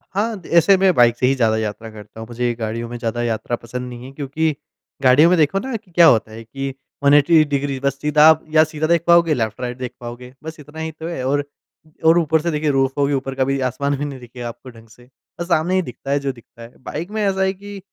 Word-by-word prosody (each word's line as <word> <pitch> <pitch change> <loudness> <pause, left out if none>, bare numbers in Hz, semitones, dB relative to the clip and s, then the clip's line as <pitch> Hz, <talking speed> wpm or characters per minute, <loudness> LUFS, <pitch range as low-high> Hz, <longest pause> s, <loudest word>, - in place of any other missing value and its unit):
हाँ 215 0 -1
दे - - -14
ऐसे 170 +4 +6
मैं 190 -1 +3
बाइक 120 -1 +4
से - - +1
ही 135 - +2
ज़्यादा 110 -4 +1
यात्रा 110 +1 -4
करता 105 0 -13
हूँ। 110 - -8
मुझे 120 0 -2
गाड़ियों 115 +1 -4
में 120 - -6
ज़्यादा 120 0 -3
यात्रा 115 +1 -2
पसंद 125 +2 -7
नहीं 120 0 -9
है। 135 - -10
क्योंकि, 145 +2 -2 0.5
गाड़ियों 135 +6 +6
में 180 - +3
देखो 160 +5 +2
ना 260 +1 -5
कि 210 -4 -9
क्या 170 0 +6
होता 110 -5 +3
है 115 +1 -9
कि 135 +4 -6 0.3
180 145 +3 +5
डिग्री 140 -1 -2
बस 140 0 -1
सीधा 150 +1 +5
आप 160 0 +3
या 155 - +6
सीधा 155 0 -3
देख 170 0 +2
पाओगे 170 -2 +5
लेफ़्ट-राइट 120 +1 -3
देख 125 -1 -6
पाओगे 125 +1 -9
बस 160 0 -8
इतना 150 +2 -11
ही 160 0 -4
तो 160 +1 -8
है 170 -7 -4
और 145 +1 +1 0.6
और 165 +2 +6
ऊपर 160 -1 +1
से 170 +1 -1
देखिए 150 0 -1
रूफ़ 135 -1 +1
होगी 140 0 +1
ऊपर 135 0 -3
का 130 - +1
भी 135 0 -1
आसमान 140 +3 -2
भी 145 - -3
नहीं 140 -2 -7
दिखेगा 120 0 -8
आपको 120 +2 -10
ढंग 115 -2 -16
से, 120 +3 -19 0.3
बस 170 - -4
सामने 175 +1 +1
ही 185 - +3
दिखता 135 -1 -7
है 145 - +2
जो 140 -1 -2
दिखता 120 -1 -18
है। 115 +1 -13
बाइक 170 +6 -5
में 215 0 -2
ऐसा 195 -1 0
है 190 0 +1
कि, 200 +1 -10
140 Hz, 255 wpm, -20 LUFS, 120-160 Hz, 0.6 s, ऐसे